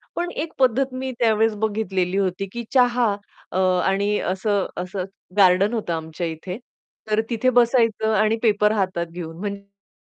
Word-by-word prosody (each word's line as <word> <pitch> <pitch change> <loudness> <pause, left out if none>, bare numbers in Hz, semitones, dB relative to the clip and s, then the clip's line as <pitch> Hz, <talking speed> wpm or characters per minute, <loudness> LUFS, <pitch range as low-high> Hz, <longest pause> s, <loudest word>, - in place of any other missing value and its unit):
पण 350 0 -2
एक 320 0 -4
पद्धत 260 +1 +2
मी 260 0 -3
त्यावेळेस 225 -1 +3
बघितलेली 195 -4 0
होती, 195 0 -1
की 235 +2 -5
चहा 245 -4 +3 0.4
अ, - - -1 0.3
आणि 200 +2 +1
असं 195 +1 0
असं 185 +1 -3 0.3
गार्डन 195 +2 +5
होतं 215 -7 -2
आमच्या 160 +1 -4
इथे. 165 +4 -6 0.5
तर 215 +1 +3
तिथे 240 +2 +1
बसायचं 230 -3 +3
आणि 215 +2 +3
पेपर 210 -2 +3
हातात 185 -5 -1
घेऊन, 165 -2 -7
म्हणजे 200 0 -8
205 Hz, 150 wpm, -22 LUFS, 185-230 Hz, 0.5 s, गार्डन